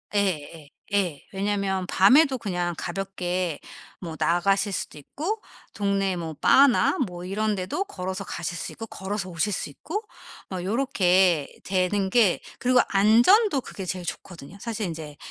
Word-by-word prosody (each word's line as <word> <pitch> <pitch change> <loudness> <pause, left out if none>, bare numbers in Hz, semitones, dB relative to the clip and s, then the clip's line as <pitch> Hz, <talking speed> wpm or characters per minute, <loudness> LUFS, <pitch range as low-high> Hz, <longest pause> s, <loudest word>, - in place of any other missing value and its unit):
예예예. 165 -6 -1 0.2
예. 180 -8 0
왜냐하면 195 -1 -1
밤에도 265 +8 +5
그냥 175 -5 -2
가볍게 180 -3 -3 0.4
뭐 165 -3 -6
나가실 195 +5 +2
수도 165 - -4
있고 335 - -4 0.3
동네 195 -2 0
뭐 165 -2 -5
바나 275 - +5
뭐 180 -1 -8
이런 210 +3 0
데도 190 - -2
걸어서 190 - -5
가실 170 -1 -4
수 - - -5
있고 225 - -7
걸어서 195 -1 -4
오실 175 +4 -1
수 190 - -3
있고 420 - -5 0.5
뭐 185 -2 -4
요렇게 185 - +2
되는 190 +1 +1
게 210 -5 +4 0.2
그리고 250 0 +3
안전도 245 - +5
그게 195 - -8
제일 180 -1 -4
좋거든요. 175 +1 -8
사실 225 -3 -3
인제 155 -3 -6
190 Hz, 295 characters per minute, -25 LUFS, 175-210 Hz, 0.5 s, 밤에도